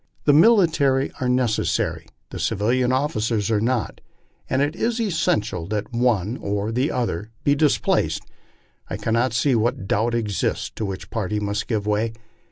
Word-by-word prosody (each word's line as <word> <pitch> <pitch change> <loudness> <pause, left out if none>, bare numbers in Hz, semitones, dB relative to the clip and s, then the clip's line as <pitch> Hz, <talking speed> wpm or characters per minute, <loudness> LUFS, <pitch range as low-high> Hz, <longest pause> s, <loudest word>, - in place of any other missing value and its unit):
The 145 - +4
military 160 - +4
are 125 - +1
necessary 125 -4 0 0.2
the - - -6
civil 105 +4 0 0.2
officers 115 -6 0
are 105 -2 +2
not; 120 -2 -1 0.5
and 130 - +1
as 145 +1 +2
it 155 - -13
is 235 +4 -1
essential 165 - 0
that 105 +1 -3
the 120 - -4
one 115 -2 +1
or 100 +2 -2
the 125 +6 0
other 110 -5 -2
be 145 - +4
displaced, 145 0 +1 0.7
I - - -3
cannot 115 +3 +1
see 130 +4 +2
what 115 -4 0
doubt 115 +4 +1
exists 105 -6 -1
as - - -33
to 110 - -4
which 95 -1 -6
party 105 -1 -2
must 105 0 -2
give 105 -4 -1
way. 105 +2 0
115 Hz, 170 wpm, -23 LUFS, 105-135 Hz, 0.7 s, The